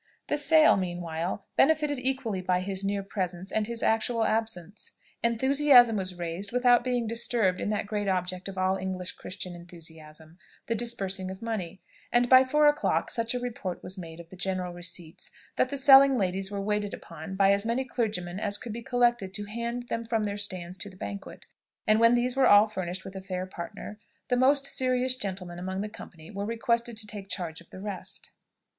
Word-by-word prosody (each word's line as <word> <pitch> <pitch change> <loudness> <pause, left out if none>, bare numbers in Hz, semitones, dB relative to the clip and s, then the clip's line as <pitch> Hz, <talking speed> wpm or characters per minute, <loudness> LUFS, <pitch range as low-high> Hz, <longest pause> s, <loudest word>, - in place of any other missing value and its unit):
The 295 - +1
sale, 310 -2 +6
meanwhile, 175 0 -3
benefited 300 -2 +3
equally 255 -6 -1
by 180 0 +1
his 190 0 -4
near 200 0 -1
presence 190 -1 -4
and 215 -1 0
his 235 -1 -4
actual 225 +1 +1
absence. 215 -3 -3 0.3
Enthusiasm 245 0 +5
was 185 -2 -3
raised 175 +3 -4
without 245 0 +4
being 245 -2 0
disturbed 225 -4 0
in - - -1
that 210 0 -1
great 205 0 -2
object 185 0 -1
of 195 -1 -7
all 185 +1 +1
English 185 -1 -4
Christian 180 -1 -7
enthusiasm 160 -1 -12 0.3
the 230 - -1
disbursing 195 -5 -2
of 190 +3 -8
money; 200 -6 -4 0.3
and 240 0 +3
by 255 +1 +8
four 300 +3 +3
o'clock 295 0 +1
such 230 0 -1
a - - 0
report 230 -7 -5
was 185 - -5
made 165 -3 -9
of 170 -1 -11
the 185 - -11
general 180 -1 -3
receipts, 175 -1 -7 0.3
that 255 - +2
the 280 - -3
selling 270 0 +8
ladies 190 -1 -1
were 200 -1 -4
waited 210 0 -1
upon 165 +3 -9
by 195 0 +5
as 200 0 +1
many 235 +4 -1
clergymen 205 -8 -2
as 205 -1 0
could 230 -1 -7
be 235 - -6
collected 240 -5 +1
to 205 - -4
hand 235 +3 -4
them 230 -1 -3
from 225 -1 -1
their 200 -1 -2
stands 185 -3 -5
to 205 - -5
the 185 - -15
banquet, 200 +1 -7 0.4
and, 215 +1 +4
when 230 +1 +6
these 245 +1 +1
were 270 -2 +4
all 205 +1 +8
furnished 185 -3 -5
with 190 - -9
a 190 - -5
fair 185 -1 -4
partner, 200 +3 -8 0.3
the 250 - +3
most 275 +3 +4
serious 255 -1 +1
gentlemen 185 -6 -6
among 190 +2 -3
the 210 - -3
company 170 -6 -12
were 200 -1 -4
requested 235 +1 -1
to 220 - -5
take 205 -2 -8
charge 170 -5 -4
of 170 - -19
the - - -10
rest. 195 -2 -6
205 Hz, 195 wpm, -28 LUFS, 185-235 Hz, 0.4 s, by